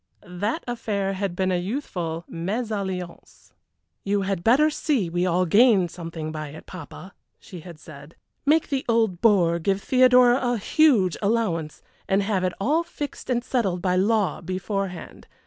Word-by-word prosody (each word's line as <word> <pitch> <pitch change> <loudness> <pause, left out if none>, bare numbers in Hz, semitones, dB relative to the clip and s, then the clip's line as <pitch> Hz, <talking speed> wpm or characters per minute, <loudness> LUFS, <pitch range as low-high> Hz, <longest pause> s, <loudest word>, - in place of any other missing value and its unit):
That 205 - -3
affair 205 -5 -2
had 195 -2 -3
been 185 0 0
a 180 - +1
youthful 175 - -4
mésalliance. 190 -1 -5 0.5
"You 200 0 0
had 190 -3 -2
better 285 +9 +4
see 260 - -1
we 175 +2 0
all 180 +1 +2
gain 200 -1 +4
something 165 -2 -6
by 155 -1 -5
it, 150 +2 -11
papa," 180 +2 -10 0.2
she 180 - -11
had 170 0 -11
said. 150 0 -13 0.3
"Make 305 +2 +2
the 275 -2 -1
old 225 -6 +1
bore 175 -7 +3
give 195 +3 0
Theodora 250 +1 +5
a 245 -1 0
huge 215 - +3
allowance, 200 -8 -1 0.2
and 195 +1 +2
have 195 -2 -1
it 180 -1 0
all 295 +11 +2
fixed 295 -5 -7
and 240 -1 0
settled 215 -9 -1
by 180 -1 +1
law 205 +1 +1
beforehand. 185 0 -5
195 Hz, 155 wpm, -24 LUFS, 175-235 Hz, 0.5 s, Theodora